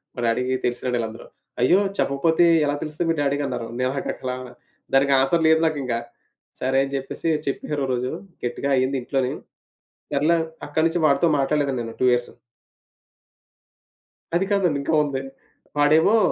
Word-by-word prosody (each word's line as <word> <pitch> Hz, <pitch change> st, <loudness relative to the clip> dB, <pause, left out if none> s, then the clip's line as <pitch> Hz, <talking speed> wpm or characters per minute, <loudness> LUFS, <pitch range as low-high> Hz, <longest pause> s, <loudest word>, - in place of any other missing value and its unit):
మా -, -, -7 dB
డ్యాడీకి 125 Hz, +3 st, +1 dB
తెలిసినాళ్ళే 125 Hz, +1 st, -1 dB
వీళ్ళందరూ. 115 Hz, -1 st, -5 dB, 0.3 s
"అయ్యో! 175 Hz, +10 st, +5 dB, 0.2 s
చెప్పకపోతే 160 Hz, +5 st, +2 dB, 0.2 s
ఎలా 145 Hz, 0 st, 0 dB
తెలుస్తుంది 155 Hz, +2 st, -3 dB
మీ -, -, 0 dB
డ్యాడీకి" 145 Hz, 0 st, 0 dB
అన్నారు. 115 Hz, -, -4 dB
నాకట్లా 130 Hz, -1 st, -2 dB, 0.6 s
దానికి 140 Hz, +1 st, +4 dB
ఆన్సర్ 160 Hz, +5 st, +2 dB
లేదు 160 Hz, 0 st, +5 dB
నాకింక. 140 Hz, -6 st, -2 dB, 0.7 s
సరే 130 Hz, +1 st, +2 dB
అని 135 Hz, -, -8 dB
చెప్పేసి 135 Hz, +4 st, -4 dB, 0.2 s
చెప్పేసారు 145 Hz, +1 st, -2 dB
ఒకరోజు 125 Hz, -1 st, -1 dB, 0.3 s
గట్టిగా 120 Hz, +3 st, -2 dB
అయింది 130 Hz, +1 st, +1 dB
ఇంట్లోనీ. 130 Hz, 0 st, -1 dB, 0.8 s
సర్లే 155 Hz, +4 st, +3 dB, 0.3 s
అక్కడి 155 Hz, +2 st, +1 dB
నుంచి 165 Hz, +1 st, -1 dB
వాడితో 140 Hz, +4 st, +3 dB
మాట్లాడలేదండి 140 Hz, -2 st, 0 dB
నేను 115 Hz, 0 st, -7 dB
2 -, -, +4 dB
ఇయర్సు. 120 Hz, 0 st, -2 dB, 2.0 s
అది 185 Hz, +3 st, +2 dB
కాదండి. 180 Hz, -7 st, +2 dB
ఇంకా 155 Hz, +3 st, -2 dB
ఉంది. 140 Hz, -2 st, -3 dB, 0.6 s
వాడేమో 155 Hz, +9 st, +5 dB
140 Hz, 135 wpm, -23 LUFS, 130-155 Hz, 2.0 s, అయ్యో